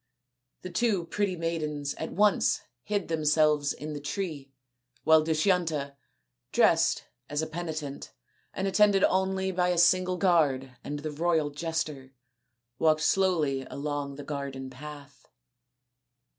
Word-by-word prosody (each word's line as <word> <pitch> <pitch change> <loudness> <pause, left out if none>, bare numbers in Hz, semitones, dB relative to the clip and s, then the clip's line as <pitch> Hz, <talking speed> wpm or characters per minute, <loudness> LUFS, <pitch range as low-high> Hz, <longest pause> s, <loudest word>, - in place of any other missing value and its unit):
The 185 - -6
two 210 -7 +1
pretty 200 +2 -1
maidens 155 -4 -2
at - - -6
once 205 +1 +3 0.2
hid 205 +5 -2
themselves 150 -2 +2
in 150 0 -6
the 145 - -5
tree 150 -4 -4 0.5
while 160 0 +6
Dushyanta, 160 -3 0 0.6
dressed - - +3 0.3
as 145 +2 -1
a - - 0
penitent 155 -3 -5 0.4
and 190 - -2
attended 200 0 +4
only 190 0 +1
by 180 -1 +1
a 180 - +1
single 185 +2 +4
guard 145 -9 +2
and 145 - -4
the 150 +1 -5
royal 160 -1 +1
jester, 150 -4 -4 0.6
walked 155 -1 +3
slowly 160 -7 +2
along 145 -1 -4
the 145 - -8
garden 140 -2 -5
path. 140 -1 -11
155 Hz, 125 wpm, -28 LUFS, 145-180 Hz, 0.6 s, while